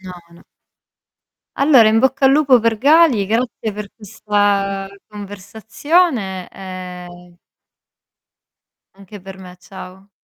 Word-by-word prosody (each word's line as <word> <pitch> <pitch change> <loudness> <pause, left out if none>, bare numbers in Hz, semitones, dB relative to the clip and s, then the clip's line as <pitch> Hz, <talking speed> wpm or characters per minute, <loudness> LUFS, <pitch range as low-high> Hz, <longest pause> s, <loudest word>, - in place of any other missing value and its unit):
No, 185 -1 -10 0.2
no. 170 - -18 1.2
Allora 270 -6 +5
in 220 +1 +2
bocca 265 +2 +1
al 270 - +4
lupo 275 -4 +4
per 225 -1 0
Gali, 280 -4 +3
grazie 225 0 -3
per 210 0 -8
questa 205 -2 -2 0.2
conversazione 210 - -3
e 180 -2 -11 1.6
Anche 195 +1 -14
per 190 +1 -12
me 180 -1 -13
ciao. 190 +1 -13
205 Hz, 105 wpm, -17 LUFS, 190-240 Hz, 1.6 s, Allora